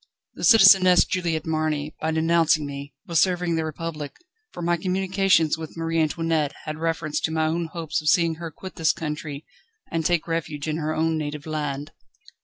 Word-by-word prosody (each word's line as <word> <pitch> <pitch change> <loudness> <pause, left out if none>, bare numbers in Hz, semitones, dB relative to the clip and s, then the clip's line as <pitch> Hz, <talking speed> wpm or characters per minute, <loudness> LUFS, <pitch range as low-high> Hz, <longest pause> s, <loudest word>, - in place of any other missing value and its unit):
The - - -9
Citizeness 195 -5 +7
Juliette 170 -4 -1
Marny, 155 -2 -1
by 160 - 0
denouncing 160 -1 +2
me, 140 0 -8
was 170 -2 +1
serving 180 -2 +1
the 160 - 0
Republic, 155 -1 -5 0.4
for 175 - -7
my 175 +1 +2
communications 185 -3 +1
with 160 +1 -8
Marie 165 0 0
Antoinette 160 -1 0
had 155 0 -6
reference 165 -2 -1
to 160 - -2
my 160 0 +1
own 165 +2 -1
hopes 160 -2 -3
of 150 - +1
seeing 170 -3 +3
her 165 - -4
quit 185 +4 -11
this 160 -1 +3
country 150 -2 -5 0.5
and 165 0 -1
take 175 0 +1
refuge 160 -3 -3
in 155 0 -1
her 155 0 -2
own 160 0 0
native 150 -1 -5
land." 150 -2 -4
160 Hz, 180 wpm, -24 LUFS, 155-170 Hz, 0.5 s, Citizeness